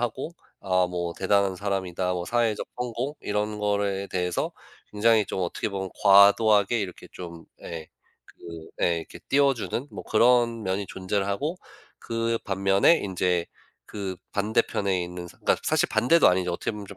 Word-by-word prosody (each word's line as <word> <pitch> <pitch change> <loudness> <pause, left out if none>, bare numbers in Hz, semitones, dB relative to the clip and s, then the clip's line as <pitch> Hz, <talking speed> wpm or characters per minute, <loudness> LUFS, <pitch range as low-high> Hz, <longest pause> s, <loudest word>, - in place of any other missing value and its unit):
하고 120 +7 -3 0.3
아 90 -2 +2
뭐 85 -1 -3
'대단한 95 -1 +1
사람이다.' 95 -2 -2
뭐 90 -1 -3
사회적 115 -2 0
성공 125 +4 -3
이런 105 +1 -2
거에 100 -1 -1
대해서 90 -2 -2 0.4
굉장히 110 0 +3
좀 95 - -4
어떻게 90 +4 -2
보면 95 -2 -4
과도하게 100 +2 +6
이렇게 90 -3 -6
좀 85 -2 -9 0.2
예. 80 -2 -7 0.4
그 85 -1 -11
예. 85 -1 +2
이렇게 80 - -10
띄워주는 140 -1 +1
뭐 - - -8
그런 115 0 +3
면이 95 +1 -2
존재를 95 +1 -2
하고 145 - -2 0.4
그 115 0 -2
반면에 95 - +3
인제 90 -3 -1 0.4
그 95 -3 -5 0.2
반대편에 100 -3 0
있는 90 0 -7
사 - - -15
그러니까 - - +1
사실 - - +2
반대도 165 +6 +4
아니죠. 90 -1 +1
어떻게 85 - -2
보면 105 -2 -8
좀 100 - -11
100 Hz, 330 characters per minute, -26 LUFS, 90-115 Hz, 0.4 s, 과도하게